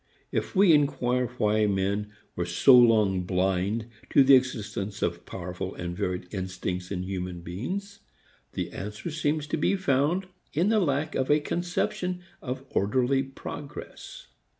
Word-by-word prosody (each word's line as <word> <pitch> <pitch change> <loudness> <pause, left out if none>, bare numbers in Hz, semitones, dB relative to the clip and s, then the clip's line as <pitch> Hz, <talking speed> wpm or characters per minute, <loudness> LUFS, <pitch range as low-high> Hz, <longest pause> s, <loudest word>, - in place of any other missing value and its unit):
If - - -2
we 190 -3 +6
inquire 125 -4 +2
why 105 -1 +2
men 100 +1 -1 0.2
were 90 0 -2
so 105 +9 +6
long 110 -6 +5
blind 95 +4 0 0.2
to 140 - +6
the 135 +1 +6
existence 110 -5 +1
of 85 0 -2
powerful 90 +1 -5
and 85 0 -5
varied 90 0 -2
instincts 90 -1 -4
in 90 -2 -3
human 90 -2 -4
beings, 190 - -5 0.5
the - - -3
answer 105 - -6
seems 150 0 0
to 150 - -2
be 160 - +2
found 165 +1 +1 0.3
in 170 +7 +2
the 220 -1 +4
lack 150 -3 0
of 130 - -1
a 150 +1 +5
conception 180 +2 -2 0.2
of 130 +1 -5
orderly 125 +6 +2
progress. 140 +2 -8
120 Hz, 145 wpm, -27 LUFS, 95-145 Hz, 0.5 s, we